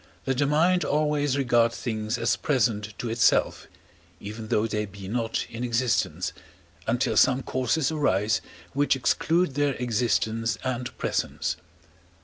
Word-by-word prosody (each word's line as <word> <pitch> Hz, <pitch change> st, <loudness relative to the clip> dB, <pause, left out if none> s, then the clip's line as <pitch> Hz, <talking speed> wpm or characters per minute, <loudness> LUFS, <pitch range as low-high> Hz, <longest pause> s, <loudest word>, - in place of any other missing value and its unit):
that 130 Hz, -1 st, 0 dB
the 145 Hz, -, +3 dB
mind 175 Hz, +5 st, +3 dB
always 145 Hz, -2 st, +1 dB
regards 120 Hz, -3 st, +2 dB
things 110 Hz, -1 st, -2 dB
as -, -, +1 dB
present 110 Hz, -7 st, 0 dB
to 120 Hz, -, -4 dB
itself, 115 Hz, +1 st, +2 dB, 0.5 s
even 110 Hz, +2 st, -7 dB
though 105 Hz, +1 st, +1 dB
they 105 Hz, -1 st, -1 dB
be 100 Hz, -2 st, -9 dB
not 115 Hz, +1 st, -1 dB
in 115 Hz, +1 st, -6 dB
existence, 115 Hz, -8 st, 0 dB, 0.5 s
until 120 Hz, +3 st, +1 dB
some 130 Hz, 0 st, +4 dB
causes 130 Hz, +4 st, 0 dB
arise 110 Hz, -8 st, +1 dB, 0.3 s
which 145 Hz, 0 st, +2 dB
exclude 165 Hz, +5 st, +1 dB
their 145 Hz, -1 st, +1 dB
existence 115 Hz, -1 st, 0 dB
and 125 Hz, -1 st, -3 dB
presence. -, -, -1 dB
120 Hz, 130 wpm, -26 LUFS, 110-140 Hz, 0.5 s, some